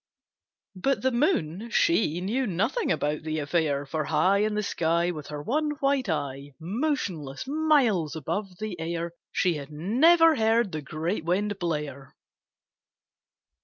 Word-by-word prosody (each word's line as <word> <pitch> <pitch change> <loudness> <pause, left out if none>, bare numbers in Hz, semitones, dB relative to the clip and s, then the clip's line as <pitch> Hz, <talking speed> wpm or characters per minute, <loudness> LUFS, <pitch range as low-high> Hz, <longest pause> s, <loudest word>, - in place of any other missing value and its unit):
But 270 +10 0
the 260 - +3
Moon, 235 - 0
she 220 - +2
knew 240 +7 -1
nothing 215 - 0
about 150 +1 -1
the 155 0 -3
affair, 145 -2 0
For 155 +2 -2
high 195 +6 +3
In 210 0 +1
the 210 - 0
sky, 170 -2 +1
With 150 -4 -7
her 150 -1 -6
one 300 - 0
white 275 -5 +1
eye, 140 -2 -3
Motionless, 185 - -2
miles 270 - +2
above 185 +5 -4
the 215 -4 -5
air, 170 +1 -3 0.2
She 180 - +2
had 140 -2 -8
never 310 - +4
heard 225 -2 +2
the 155 -2 -4
great 160 +5 -3
Wind 195 +4 -1
blare. 150 -6 -4
180 Hz, 140 wpm, -27 LUFS, 155-235 Hz, 0.2 s, never